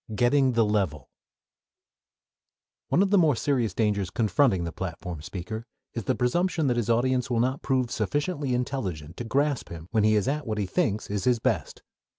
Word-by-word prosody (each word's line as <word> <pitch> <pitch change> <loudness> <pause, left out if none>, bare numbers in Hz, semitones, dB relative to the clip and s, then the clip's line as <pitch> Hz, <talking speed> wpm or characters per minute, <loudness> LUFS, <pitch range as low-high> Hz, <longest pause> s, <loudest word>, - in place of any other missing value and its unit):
III 110 - -5
GETTING 130 +3 +3
THE 115 -1 +3
LEVEL 95 -10 -1 1.8
One 185 - +3
of 195 - -1
the 200 - +6
more 155 -6 +4
serious 125 -3 0
dangers 105 -4 +1
confronting 110 -2 +2
the 85 - -3
platform 85 -2 -6
speaker 95 +7 -6 0.3
is 115 -4 -4
the - - +1
presumption 160 +6 +1
that 125 -3 +1
his 120 -1 -1
audience 125 +2 +2
will 120 -2 +1
not 130 +3 0
prove 130 -3 0
sufficiently 145 -3 -1
intelligent 95 - -3
to - - -4
grasp 140 +3 0
him 85 +1 -9
when 110 -2 +2
he 110 0 +4
is 105 - +1
at 145 0 -1
what 110 -1 -2
he 105 - 0
thinks 110 - 0
is 100 -2 -2
his 125 -1 +4
best. - - -2
120 Hz, 185 wpm, -26 LUFS, 100-135 Hz, 1.8 s, the